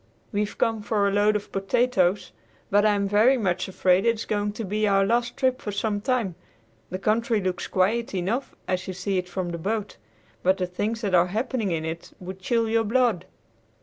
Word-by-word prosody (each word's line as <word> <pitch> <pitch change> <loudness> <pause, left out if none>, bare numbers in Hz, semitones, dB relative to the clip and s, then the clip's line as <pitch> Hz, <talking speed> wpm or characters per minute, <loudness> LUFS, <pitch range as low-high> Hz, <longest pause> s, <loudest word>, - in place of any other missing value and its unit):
We've 210 0 -2
come 225 -1 +1
for 205 -1 +1
a - - +1
load 205 +1 +3
of 205 0 -4
potatoes, 195 -1 +1 0.4
but 205 +2 +5
I 210 - +3
am 200 0 0
very 220 +7 +4
much 185 -5 -1
afraid 185 0 +2
it 230 0 +3
is 220 - -6
going 205 -1 -1
to 225 - -5
be 210 +2 0
our 195 -1 +3
last 235 +3 0
trip 260 -2 +1
for 205 - -4
some 205 0 -1
time. 235 -5 0 0.6
The 185 - -3
country 220 +3 +1
looks 185 -2 -2
quiet 205 +4 0
enough 205 +9 -2
as 185 -1 -1
you 185 - -4
see 195 0 -1
it 180 0 -6
from 180 0 -3
the 170 -1 -4
boat, 205 +3 -3 0.4
but 190 +1 +3
the 185 - 0
things 210 +5 -3
that 200 -4 -2
are 180 0 +5
happening 220 +2 -1
in 160 -2 -2
it 165 +1 -6
would 185 +1 -8
chill 230 +3 +1
your 225 0 +2
blood." 225 -5 +1
205 Hz, 210 wpm, -25 LUFS, 185-225 Hz, 0.6 s, but